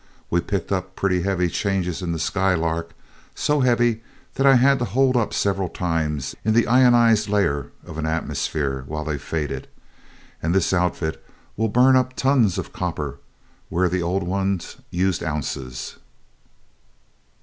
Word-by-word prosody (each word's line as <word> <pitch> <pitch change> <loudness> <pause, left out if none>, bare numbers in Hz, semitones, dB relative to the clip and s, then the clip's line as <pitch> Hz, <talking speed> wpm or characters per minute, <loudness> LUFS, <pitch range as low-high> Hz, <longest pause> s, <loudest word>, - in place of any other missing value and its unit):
We 85 - +2
picked 100 -1 -3
up 95 -1 -2
pretty 90 -2 +1
heavy 90 -1 +1
charges 90 0 -1
in 90 -2 -2
the 85 - -2
Skylark 85 -2 0 0.4
so 150 0 +1
heavy 120 -3 +2 0.3
that 135 +1 +2
I 135 - +7
had 135 +2 +4
to 120 - 0
hold 130 +1 +2
up 120 -3 +1
several 95 -2 0
times 80 -5 -2
in 110 +1 +1
the 115 - +4
ionized 120 -3 +4
layer 85 -9 0
of 80 - -7
an 80 - -1
atmosphere 75 -4 -2
while 75 0 -4
they 75 -2 -3
faded 75 -3 -4 0.7
and 85 +3 0
this 95 -1 +2
outfit 90 -3 -1 0.3
will 110 +1 0
burn 125 +4 +5
up 130 0 +2
tons 130 -8 +2
of - - -5
copper 75 -6 -4 0.5
where 90 +2 +2
the 90 +1 -1
old 90 +3 -1
ones 95 0 -2
used 90 0 0
ounces." 65 -5 -4
95 Hz, 150 wpm, -23 LUFS, 80-110 Hz, 0.7 s, I